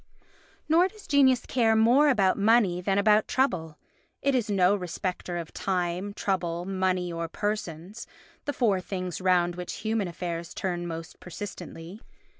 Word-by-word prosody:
Nor 335 Hz, +4 st, +5 dB
does 420 Hz, +1 st, -15 dB
genius 265 Hz, -4 st, +4 dB
care 225 Hz, -3 st, +2 dB
more 245 Hz, +7 st, +5 dB
about 195 Hz, -8 st, +3 dB
money 205 Hz, -4 st, +3 dB
than 195 Hz, +2 st, 0 dB
about 210 Hz, +1 st, +4 dB
trouble. 170 Hz, -, 0 dB, 0.5 s
It 275 Hz, -, +2 dB
is 240 Hz, -4 st, 0 dB
no 195 Hz, -1 st, +4 dB
respecter 180 Hz, -1 st, -4 dB
of 170 Hz, -2 st, -6 dB
time, 180 Hz, +1 st, -2 dB
trouble, 175 Hz, -4 st, -2 dB
money 185 Hz, -2 st, -1 dB
or 165 Hz, 0 st, -3 dB
persons, 205 Hz, +1 st, -4 dB, 0.4 s
the 290 Hz, -, -2 dB
four 205 Hz, -9 st, +1 dB
things 185 Hz, -1 st, -4 dB
round 175 Hz, -2 st, +2 dB
which 180 Hz, 0 st, -5 dB
human 220 Hz, -3 st, 0 dB
affairs 170 Hz, -1 st, -5 dB
turn 175 Hz, -2 st, -2 dB
most 165 Hz, -1 st, -7 dB
persistently. 180 Hz, 0 st, -8 dB
190 Hz, 145 wpm, -27 LUFS, 175-220 Hz, 0.5 s, Nor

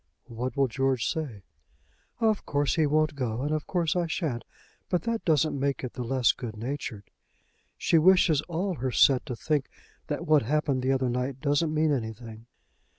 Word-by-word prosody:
"What 125 Hz, +3 st, -5 dB
will 135 Hz, -1 st, +3 dB
George 130 Hz, +1 st, 0 dB
say?" 140 Hz, -, -3 dB, 0.8 s
"Of 220 Hz, -3 st, +2 dB
course 145 Hz, -1 st, 0 dB
he 160 Hz, -2 st, +2 dB
won't 155 Hz, +1 st, +2 dB
go; 125 Hz, -3 st, -3 dB
and 145 Hz, -, -1 dB
of 155 Hz, -1 st, -2 dB
course 170 Hz, -4 st, 0 dB
I 175 Hz, -1 st, +1 dB
shan't. 155 Hz, -7 st, -2 dB, 0.5 s
But 180 Hz, -3 st, 0 dB
that 230 Hz, -1 st, -2 dB
doesn't 155 Hz, -3 st, +2 dB
make 140 Hz, 0 st, -1 dB
it 125 Hz, -, -5 dB
the 125 Hz, -, -6 dB
less 125 Hz, 0 st, +3 dB
good 115 Hz, -4 st, -7 dB
natured. 120 Hz, -3 st, -5 dB, 0.7 s
She 165 Hz, -, +3 dB
wishes 170 Hz, -3 st, +5 dB
all 180 Hz, +3 st, -1 dB
her 130 Hz, -5 st, -2 dB
set 130 Hz, +1 st, +4 dB
to 125 Hz, -, -3 dB
think 145 Hz, +2 st, -1 dB, 0.4 s
that 155 Hz, +2 st, -3 dB
what 155 Hz, -3 st, +5 dB
happened 140 Hz, +1 st, 0 dB
the 130 Hz, +1 st, +1 dB
other 130 Hz, -1 st, +1 dB
night 125 Hz, +2 st, -2 dB
doesn't 145 Hz, +3 st, +1 dB
mean 155 Hz, 0 st, +2 dB
anything." 115 Hz, -2 st, -5 dB
140 Hz, 180 wpm, -27 LUFS, 125-155 Hz, 0.8 s, wishes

